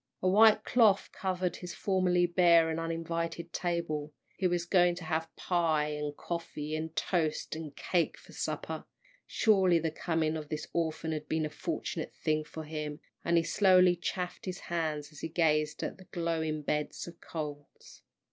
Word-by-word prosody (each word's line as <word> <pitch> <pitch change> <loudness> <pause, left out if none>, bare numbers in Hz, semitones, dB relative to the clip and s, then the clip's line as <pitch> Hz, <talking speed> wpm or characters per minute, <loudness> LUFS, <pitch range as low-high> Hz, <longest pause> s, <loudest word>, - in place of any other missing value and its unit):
A - - +3
white 215 +3 +6
cloth 220 -5 +4
covered 185 -1 -2
his 180 -1 -7
formerly 185 -2 +2
bare 170 -2 +5
and 160 - -2
uninviting 165 0 -3
table; 160 -4 -2 0.2
he 190 - +1
was 175 -1 0
going 175 -1 +4
to 175 - -8
have 160 0 -1
pie, 160 -4 +1
and 150 -1 -4
coffee, 155 -3 -4
and 160 +1 -4
toast 160 -5 0
and 155 -3 -7
cake 175 -3 0
for - - -16
supper, - - -4 0.4
surely 190 -6 +4
the 165 -1 -1
coming 160 -1 0
of 150 -1 -7
this 150 -1 -3
orphan 160 -1 -1
had 155 -1 -4
been 160 -1 +1
a 150 - -4
fortunate - - -4
thing 155 0 0
for 160 +1 -8
him, 150 -1 -5 0.2
and 170 0 +3
he 165 - +4
slowly 185 -1 +5
chafed 180 +1 -4
his 185 -2 -5
hands 155 -3 -2
as 150 - -12
he 160 - -4
gazed 155 -2 +1
at - - -4
the 185 - -13
glowing 160 -3 -2
bed 150 +1 -1
of 170 -1 -12
coals. 145 -3 -7
165 Hz, 170 wpm, -31 LUFS, 155-175 Hz, 0.4 s, white